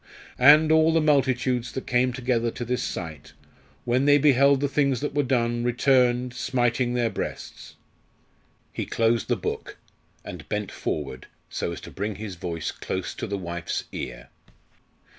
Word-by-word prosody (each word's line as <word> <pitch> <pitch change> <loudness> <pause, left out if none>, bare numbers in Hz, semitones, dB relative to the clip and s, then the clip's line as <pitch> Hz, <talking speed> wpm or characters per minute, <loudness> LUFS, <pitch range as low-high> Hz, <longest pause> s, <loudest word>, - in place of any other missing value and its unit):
"_And 150 +4 +7
all 160 0 +5
the 165 - +3
multitudes 130 -4 +1
that 130 - -5
came 125 +1 +2
together 120 -2 0
to 120 - -6
this 125 +1 -1
sight, 80 -7 -6 0.5
when 125 +3 +1
they 145 0 +6
beheld 140 -1 +4
the 145 - +1
things 140 -3 +1
that 145 - -3
were 145 - +2
done, 120 -3 0
returned, 125 0 +2
smiting 125 -1 0
their 120 -2 +1
breasts_." - - -6 1.0
He - - -4
closed 115 0 +1
the - - +1
book, - - -5 0.5
and 80 -4 -9
bent 105 -2 -2
forward, 70 -4 -4 0.2
so - - -3
as - - -6
to - - -10
bring 105 +1 -4
his 105 0 -6
voice 85 -2 -4
close - - -4
to - - -5
the 100 - -3
wife's 85 -3 -4
ear. - - -7
125 Hz, 160 wpm, -25 LUFS, 110-135 Hz, 1.0 s, And